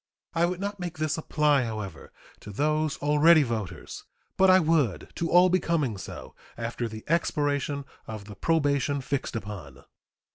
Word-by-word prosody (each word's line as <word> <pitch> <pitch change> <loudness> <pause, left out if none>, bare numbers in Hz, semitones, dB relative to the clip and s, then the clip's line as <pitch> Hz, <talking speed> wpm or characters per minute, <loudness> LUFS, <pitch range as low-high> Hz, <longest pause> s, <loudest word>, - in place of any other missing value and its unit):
I 170 0 +2
would 180 0 -3
not 200 0 -4
make 175 -1 -5
this 155 -1 0
apply, 150 -3 +2
however, 110 -4 -6 0.3
to - - -11
those 150 +6 0
already 150 +2 +6
voters, 110 -7 -5 0.3
but 190 0 +5
I 185 0 +7
would 155 - +1
to 170 - -2
all 180 +1 +6
becoming 170 - +1
so 95 - -9 0.2
after 115 0 -3
the 110 -1 -8
expiration 145 -3 0 0.2
of 110 -2 -7
the 105 - -9
probation 145 +1 +1
fixed 135 -1 -3
upon. 95 - -7
145 Hz, 150 wpm, -27 LUFS, 115-165 Hz, 0.3 s, I